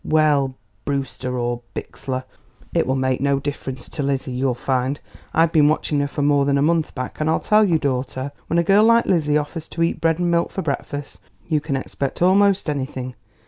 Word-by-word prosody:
"Well, 145 -4 +2 0.3
Brewster 135 -2 -3
or 120 0 -2
Bixler; 130 -1 -5 0.5
it - - +1
will 130 - +1
make 130 -1 0
no 140 0 +2
difference 135 -3 -5
to 150 - -5
Lizzie, 135 -1 -1
you'll 125 0 0
find. 130 +2 -1 0.3
I've 165 0 +3
been 150 -3 +5
watching 150 -1 +1
her 145 - +1
for 145 0 -3
more 145 -1 +4
than 140 0 +2
a 140 - +2
month 160 0 +1
back, 130 -2 -5
and 155 - +1
I'll 160 - +2
tell 215 0 +4
you, 175 -6 +3
daughter, 130 -1 -2 0.2
when 170 - 0
a 170 - +4
girl 200 +5 +5
like 230 +1 +5
Lizzie 150 -5 +2
offers 155 +2 -4
to 165 - -2
eat 165 - -1
bread 165 -1 +2
and 175 -1 0
milk 170 0 +1
for 190 - -3
breakfast 145 - -4 0.3
you 150 +3 +1
can 145 -2 -2
expect 135 0 -3
almost 195 +1 +4
anything. 130 -3 -3
145 Hz, 205 wpm, -21 LUFS, 130-165 Hz, 0.5 s, been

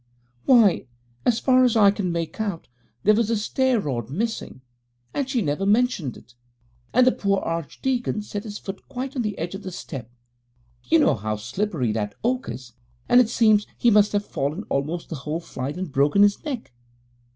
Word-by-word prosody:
'Why, 225 - +5 0.4
as 235 - +4
far 255 0 +4
as 245 -3 +3
I 200 -2 +7
can 195 -3 -2
make 170 +5 -3
out, 200 -6 -3 0.4
there 215 - +6
was 220 0 +1
a 230 - +2
stair 255 +3 +1
rod 120 - -3
missing, 200 - -4 0.5
and 275 -2 -2
she 250 -5 0
never 150 +4 -1
mentioned 205 - +1
it, 120 - -18 0.6
and 255 +1 +5
the 255 - +6
poor 200 -4 0
archdeacon 210 - -2
set 205 0 -5
his 210 -2 -6
foot 195 -1 -8
quite 270 +1 -5
on 255 - 0
the 210 -3 -3
edge 170 +3 -4
of 195 - -6
the 190 - -6
step 135 -8 -7 0.8
you 330 - +4
know 305 - +4
how 105 0 -3
slippery 125 - -2
that 105 -1 -3
oak 250 +2 0
is 125 -2 -8 0.3
and 245 +1 +7
it 230 - +1
seems 215 -3 +3
he 240 - +4
must 210 0 +5
have 205 0 0
fallen 150 +9 -3
almost 155 +5 -2
the 160 - -4
whole 150 +4 -3
flight 140 -2 -5
and 185 -4 -4
broken 145 +9 +4
his 205 0 +2
neck. 260 - -5
205 Hz, 190 wpm, -24 LUFS, 150-235 Hz, 0.8 s, I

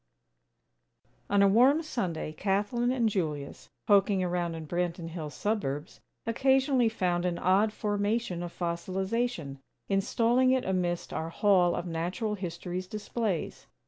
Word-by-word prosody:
XX - - -48 0.3
On 200 - +5
a - - +6
warm 255 +10 +5
Sunday, 180 - -3
Kathlyn 205 +7 0
and 245 -3 +2
Julius, 155 -9 -3 0.2
poking 200 -2 +4
around 175 -2 -1
in 160 -1 -6
Branton 175 0 -2
Hills' 155 -5 -6
suburbs, 150 - -2 0.3
occasionally 265 +1 +3
found 180 -5 0
an 180 -1 -1
odd 195 +5 +3
formation 205 -3 -1
of 175 -1 -5
fossilization, 185 - -2 0.3
installing 230 +6 +2
it 260 - 0
amidst 180 -2 -1
our 160 - -3
Hall 180 -1 +3
of 175 - -3
Natural 175 +6 -2
History's 180 -1 -5
displays. 210 -2 -3
190 Hz, 130 wpm, -29 LUFS, 170-220 Hz, 0.3 s, a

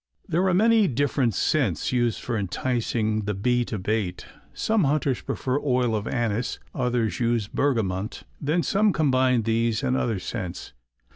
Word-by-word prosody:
There 180 +1 +1
are 185 - +2
many 220 +1 +4
different 135 - 0
scents 130 - +1
used 120 -5 +1
for 120 - -3
enticing 110 +1 -1
the 105 -1 -1
bee 120 +5 +1
to 110 - -4
bait. 100 -2 -2 0.3
Some 220 -6 +1
hunters 140 -2 +1
prefer 130 +2 -2
oil 125 -5 +1
of 105 0 -3
anise, 120 0 -1 0.2
others 125 -3 -1
use 115 -3 +1
bergamont; 110 -7 -1 0.2
then 160 +4 +1
some 205 0 +2
combine 130 -5 +2
these 115 +2 0
or 130 -1 +1
other 115 -5 0
scents. 95 -2 -6
120 Hz, 150 wpm, -25 LUFS, 110-140 Hz, 0.3 s, many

